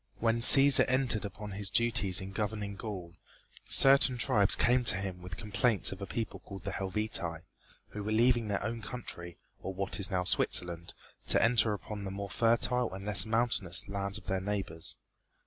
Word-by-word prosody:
When 115 0 -1
Cæsar 135 +3 +10
entered 125 -5 -1
upon 105 +1 -10
his 100 0 -4
duties 100 -3 0
in 95 +1 -9
governing 105 -1 -5
Gaul, 95 -5 -9 0.5
certain 135 -2 +4
tribes 105 -4 +3
came 125 +1 +1
to 105 - +3
him 95 -2 -7
with 90 0 -10
complaints 105 +1 0
of 95 0 -10
a 100 - -7
people 115 -2 -6
called 95 -2 -13
the - - -6
Helvetii, 95 -4 -3 0.5
who 105 - -9
were 105 - -5
leaving 120 0 +1
their 100 0 -4
own 115 +1 -6
country, 85 -8 -10 0.2
or 95 - -8
what 100 +2 -1
is 100 - +1
now 90 -1 -2
Switzerland, 90 -1 -1 0.3
to - - +3
enter 115 -2 +1
upon 105 0 -9
the 95 - -6
more 100 +1 -8
fertile 120 +1 -1
and 95 +1 -10
less 105 +1 +3
mountainous 115 -6 -2
lands 100 0 -3
of - - -15
their 95 0 -4
neighbors. 95 -5 -5
105 Hz, 180 wpm, -29 LUFS, 95-115 Hz, 0.5 s, Cæsar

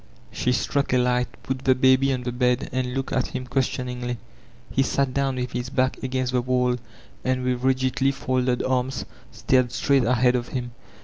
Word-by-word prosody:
She 125 - 0
struck 140 +2 0
a - - +5
light, 125 0 +2 0.2
put 135 -1 -3
the 130 0 +3
baby 130 +1 +4
on 130 -1 -2
the 125 - -2
bed, 125 0 +1
and 130 0 -1
\o6ktA 135 +2 -3
at 130 - +1
him 130 -1 -5
questioningly. 125 -1 -2 0.5
He 135 - +2
had 135 - +1
sat 135 -2 +1
down 135 -1 0
with 125 -1 -3
his 125 0 -3
bock 130 -1 +1
against 130 -1 -1
the 125 - +2
wall, 125 0 +1 0.5
and 130 0 0
with 125 -1 0
rigidly 130 +1 +2
folded 130 -2 0
arms 130 0 -1 0.3
stared 130 -2 +2
straight 135 0 +2
ahead 125 +1 +3
of 120 0 -1
him. 120 -2 -4
130 Hz, 190 wpm, -24 LUFS, 125-130 Hz, 0.5 s, a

